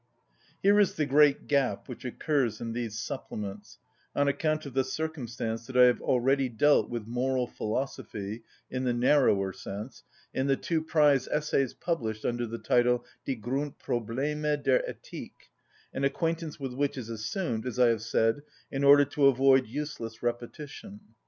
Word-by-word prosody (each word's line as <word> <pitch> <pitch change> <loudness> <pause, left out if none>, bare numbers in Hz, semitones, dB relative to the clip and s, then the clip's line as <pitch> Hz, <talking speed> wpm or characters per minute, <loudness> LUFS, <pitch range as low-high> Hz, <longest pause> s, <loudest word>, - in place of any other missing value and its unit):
Here 200 +1 +5
is 205 - +3
the 155 - +1
great 145 0 +4
gap 140 -3 0
which 125 0 -9
occurs 125 -3 0
in 115 -1 -4
these 115 -3 -4
supplements, 105 -2 -6 0.4
on 145 0 +2
account 155 +2 0
of 140 - -7
the 135 +1 +2
circumstance 120 -8 -4
that 130 - -3
I 125 - +9
have 125 -1 +4
already 130 +1 +2
dealt 145 +6 +3
with 120 -3 -4
moral 125 +2 0
philosophy 110 -3 -4 0.3
in 130 0 -2
the 125 -1 +1
narrower 120 -7 +3
sense 100 +6 -7 0.3
in 130 +1 0
the 135 - +3
two 160 +3 -1
prize 150 -4 +3
essays 145 -4 0
published 115 -11 -3
under 120 0 -1
the 115 +1 -5
title, 120 0 +2 0.2
"Die 135 - 0
Grundprobleme 140 +3 -2
der - - +4
Ethik," - - -10 0.4
an 135 - -3
acquaintance 165 +3 -1
with 135 -2 -4
which 140 +1 -1
is 120 -4 -5
assumed, 115 - -3
as 125 - -4
I 125 -1 +5
have 115 -2 +1
said, 115 +3 +1 0.3
in 135 +1 -2
order 145 +1 +8
to 145 0 +3
avoid 135 -1 +4
useless 120 -4 -6
repetition. 145 - -5
130 Hz, 160 wpm, -29 LUFS, 115-145 Hz, 0.4 s, I